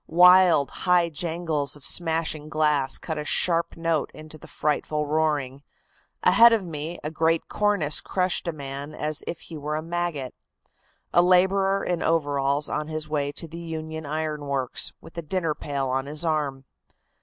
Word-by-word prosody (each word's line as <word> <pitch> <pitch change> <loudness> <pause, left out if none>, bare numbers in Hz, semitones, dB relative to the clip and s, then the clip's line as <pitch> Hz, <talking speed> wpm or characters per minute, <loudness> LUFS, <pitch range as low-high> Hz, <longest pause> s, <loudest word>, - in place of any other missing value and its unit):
Wild, 180 -3 +6
high 180 -2 +2
jangles 160 -3 -2
of 145 - -8
smashing 160 -3 +1
glass 150 -3 +1
cut 160 -2 -5
a - - -3
sharp 165 +4 +1
note 165 -3 0
into 155 0 -11
the - - -13
frightful 150 0 -1
roaring. 145 -3 -1 0.6
Ahead 235 0 +7
of 215 -4 0
me 160 +1 -5
a 150 - -3
great 160 +1 +1
cornice 205 -8 0
crushed 185 -1 -1
a - - +1
man 140 0 -7
as 155 0 -2
if 170 - -5
he 165 - -9
were 150 +1 -3
a 155 - -3
maggot 170 -6 -3 0.8
a 175 - +6
laborer 190 +2 +3
in 175 -2 -1
overalls 145 -2 +1
on 150 - -3
his 155 -1 -4
way 145 -2 -1
to 165 - -6
the 165 +2 -9
Union 160 -2 -6
Iron 155 -1 -3
Works, 135 -3 -1
with 170 - -9
a - - -3
dinner 165 0 -1
pail 140 -2 -3
on 135 +1 -1
his 150 +3 -1
arm. 145 -4 -1
155 Hz, 165 wpm, -25 LUFS, 145-170 Hz, 0.8 s, Ahead